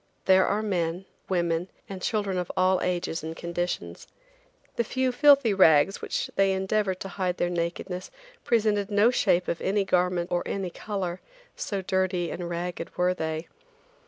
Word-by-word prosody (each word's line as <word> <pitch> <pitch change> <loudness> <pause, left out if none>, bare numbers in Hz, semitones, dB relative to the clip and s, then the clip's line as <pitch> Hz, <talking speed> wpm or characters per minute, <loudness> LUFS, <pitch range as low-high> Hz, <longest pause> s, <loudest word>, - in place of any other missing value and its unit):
There 190 0 +5
are 210 +2 0
men, 180 -3 -1 0.2
women 170 -1 0 0.2
and 190 -2 -7
children 200 -4 -1
of 180 - -3
all 185 0 +3
ages 175 -2 -1
and 160 +1 -5
conditions. 175 +1 -4 0.7
The 235 - +1
few 260 +3 0
filthy 280 -3 +5
rags 175 -1 +5
with - - -19
which - - -1
they 195 -1 +3
endeavored 190 0 0
to - - -4
hide 185 -2 -2
their 175 - 0
nakedness 175 +2 -3 0.3
presented 210 -3 +1
no 210 +3 +4
shape 180 -7 +2
of 170 - -2
any 200 +1 +1
garment 180 -1 +1
or 175 0 +1
any 190 -3 -3
color, 185 -4 -4 0.3
so 195 -2 -3
dirty 185 -2 0
and 175 -1 -5
ragged 175 0 -5
were 180 +1 +2
they. 160 -1 -4
185 Hz, 160 wpm, -27 LUFS, 175-200 Hz, 0.7 s, There